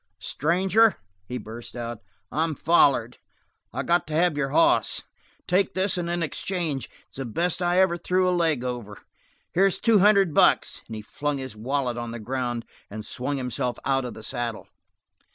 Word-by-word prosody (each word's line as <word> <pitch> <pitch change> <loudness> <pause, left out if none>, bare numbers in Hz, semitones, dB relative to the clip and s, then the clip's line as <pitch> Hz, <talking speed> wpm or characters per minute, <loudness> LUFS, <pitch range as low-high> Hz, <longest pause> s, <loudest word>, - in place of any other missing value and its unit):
"Stranger," 190 - +2 0.3
he 125 - -4
burst 115 +1 -9
out, 120 -2 -5 0.3
"I'm 160 0 0
follered. 135 -7 +3 0.5
I - - -3
got 175 -1 +2
to 155 - -3
have 170 -1 +3
your 140 -2 -1
hoss. 330 - +3 0.4
Take 185 +2 +1
this 190 +1 +1
one 175 -2 -2
in 175 0 0
exchange; 160 -2 -3 0.2
it's - - -11
the 135 - -3
best 170 +10 -1
I 175 0 +2
ever 190 -2 +3
threw 185 +2 +1
a 180 - +2
leg 160 -7 +1
over. 120 -5 -5 0.5
Here's 195 +1 +3
two 225 -3 +4
hundred 195 -4 +5
bucks - - +3
" - - -32
he 110 -1 -7
flung 145 +6 -3
his 130 -4 -7
wallet 125 +2 -1
on 120 -1 -4
the 115 0 -6
ground 120 0 -3 0.2
and 105 +1 -6
swung 140 +3 -2
himself 125 -1 -2
out 135 -1 +2
of 125 - -6
the 110 - -10
saddle. 120 -3 -4
145 Hz, 175 wpm, -25 LUFS, 120-175 Hz, 0.5 s, hundred